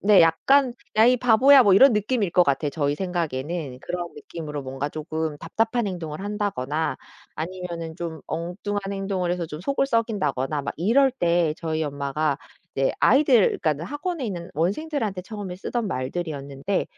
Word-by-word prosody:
네 205 -1 +6
약간 245 - +4 0.2
"야 220 - +7
이 250 - +5
바보야." 250 +3 +6
뭐 205 -4 +5
이런 240 +6 +7
느낌일 210 -1 0
것 180 - +5
같아요 140 0 +1
저희 145 -1 0
생각에는. 160 -5 -3
그런 175 +2 -5
느낌으로 150 -1 -7
뭔가 135 +2 -4
쪼금 155 0 -4
답답한 225 +8 0
행동을 165 -5 -5
한다거나 195 - -2 0.4
아니면은 170 -1 -5
좀 165 -2 -5
엉뚱한 195 +4 -4
행동을 195 -3 -1
해서 175 -2 -3
좀 155 -1 -8
속을 275 +4 +1
썩인다거나 155 - 0
막 140 - -5
이럴 240 - +4
때 170 -9 +1
저희 160 -1 -2
엄마가 145 0 -1 0.4
이제 135 0 +1
아이들 260 -4 +4
그러니까 155 0 0
학원에 290 - -3
있는 175 -5 -5
원생들한테 205 - -1
처음에 195 -3 -7
쓰던 230 +3 -3
말들이었는데 140 +3 -3
175 Hz, 370 characters per minute, -24 LUFS, 155-210 Hz, 0.4 s, 야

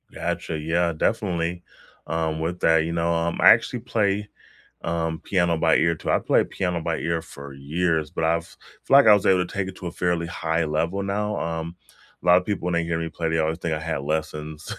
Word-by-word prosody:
Gotcha, 80 - -3
yeah, 85 +2 +1
definitely, 85 -1 -1 0.4
um, 80 -1 -1
with 85 +2 -3
that, 80 0 +4
you 85 - -3
know, 85 0 0
um, 85 0 -1
I - - +8
actually 115 +2 +2
play, 105 -4 0 0.6
um, 80 -1 -2
piano 85 -3 +1
by 80 0 +3
ear, 85 +1 +3
too. - - -3
I've - - +1
played - - +2
piano 90 -3 -2
by 80 0 -2
ear 85 0 -1
for 70 -3 -11
years, 80 +3 -1
but 80 - -3
I've 85 +1 -1 0.3
it's - - -29
like 140 -3 +7
I 105 - +9
was 100 0 +2
able 90 -2 +4
to - - -12
take 95 -1 -2
it 95 - -10
to 90 - -6
a - - -4
fairly 85 -1 -1
high 80 -1 -1
level 85 +6 -1
now, 105 +1 -2
um, 80 +1 -4 0.5
a - - -11
lot 90 0 +7
of 90 - -1
people, 100 -4 -3
when 90 - -1
they 85 0 +1
hear 85 0 -1
me 80 0 -3
play, 80 +1 -3
they 80 0 0
always 80 +1 0
think 85 -2 -2
I 75 - -2
had 80 -3 -3
lessons, 75 0 -4
85 Hz, 225 wpm, -24 LUFS, 80-90 Hz, 0.6 s, I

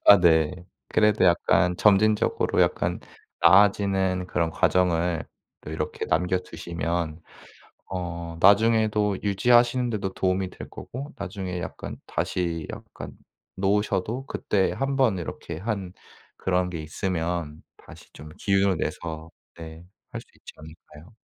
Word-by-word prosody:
아 100 - +10
네 85 +1 +3 0.2
그래도 105 -2 +3
약간 90 0 +3
점진적으로 105 +2 +3
약간 - - 0 0.4
나아지는 95 0 +4
그런 85 -2 0
과정을 85 -1 +1 0.4
또 - - -9
이렇게 - - -4
남겨 90 +3 +1
두시면 85 -1 -4 0.7
어 85 -2 -5
나중에도 105 0 +4
유지하시는 120 +4 +3
데도 100 -4 -3
도움이 95 0 0
될 - - -10
거고 140 +5 -8
나중에 95 -4 -5
약간 95 - -7 0.2
다시 85 -3 -1
약간 - - -9 0.4
놓으셔도 105 +5 0
그때 100 -7 0
1 135 0 -2
번 120 -8 +2
이렇게 85 -1 -6
한 100 -1 -4 0.5
그런 90 -1 0
게 85 -3 -5
있으면 80 -1 -3 0.2
다시 - - -15
좀 75 +2 -11
기운을 100 -2 +2
내서 80 0 -5 0.2
네 80 0 -10 0.3
할 - - -5
수 - - -21
있지 - - -13
않을까요? 80 +4 -15
90 Hz, 260 characters per minute, -25 LUFS, 85-105 Hz, 0.7 s, 아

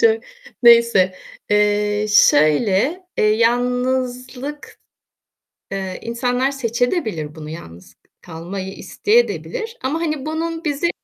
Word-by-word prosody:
Çok, 455 0 +3 0.4
neyse. 235 -6 +6 0.4
Eee, 210 0 +2
şöyle, 200 - +3 0.2
eee, - - +3
yalnızlık, 250 +4 -1 0.9
eee, 190 -1 -4
insanlar 245 +3 -1
seçedebilir 245 - -1
de 150 - -17
bunu 155 -1 -9
yalnız 85 - -11
k - - -50 0.2
kalmayı 185 +3 -7
isteyedebilir 460 - -1
ama 285 +5 -1
hani 305 -4 -2
bunun 325 +1 -3
bizi 295 +3 0
235 Hz, 105 wpm, -20 LUFS, 195-285 Hz, 0.9 s, neyse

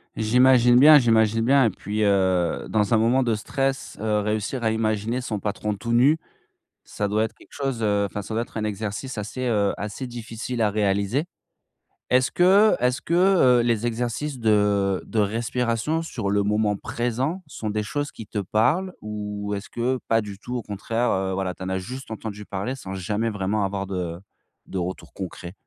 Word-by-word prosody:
J'imagine 125 +2 +5
bien, 150 +3 +9
j'imagine 115 -2 +3
bien 135 +2 +5
et - - +4
puis, 105 +3 -3
heu, 95 -4 +1
dans 105 0 +1
un - - +6
moment 120 +4 +3
de 120 -2 +1
stress, 135 +5 -2
heu, 105 -1 +1
réussir 105 +4 -2
à 110 - +3
imaginer 110 +2 -1
son 110 -4 -3
patron 105 +1 -2
tout 105 +3 -5
nu, 130 +7 +5 0.7
ça 105 - -3
doit 105 +2 +1
être 110 - -5
quelque - - -20
chose 135 -5 -3
heu, 105 -1 +2
enfin 100 +1 -4
ça 110 - -6
doit 115 - +1
être - - -18
un 110 - -1
exercice 105 +4 -4
assez, 115 +5 -4
heu, 105 -3 +2
assez 105 +6 -5
difficile 120 0 -5
à 105 - +3
réaliser. 100 +6 0 0.9
Est-ce 130 0 +3
que 195 +4 +5
est-ce 125 +1 +1
que, 170 - -4
heu, 175 -9 +5
les 115 -1 0
exercices 120 +4 -2
de 105 -3 +2
de 115 - -2
respiration 115 +7 0
sur 115 -11 -3
le 100 0 +2
moment 105 +1 +1
présent, 125 - -2
sont 125 -7 -5
des 105 0 -1
choses 145 +5 -3
qui 110 - -9
te 105 0 -4
parlent? 130 - +1
Ou 105 -1 -4
est-ce 100 +1 -5
que, 125 +2 -1
pas 115 0 +3
du 100 -2 -8
tout, 125 +3 -6
au 120 - -5
contraire, 115 +4 -1
heu, 95 0 0
voilà 95 -1 -2
tu - - -18
en 95 - -3
as 95 - -1
juste 125 +8 -7
entendu 110 -1 -6
parler 100 +6 -3
sans 95 -7 -7
jamais 105 +5 -1
vraiment 105 0 -1
avoir 100 0 -3
de 90 -3 -4 0.5
de 95 - -4
retour 90 +1 -5
concret? 90 -1 -7
110 Hz, 190 wpm, -24 LUFS, 100-125 Hz, 0.9 s, bien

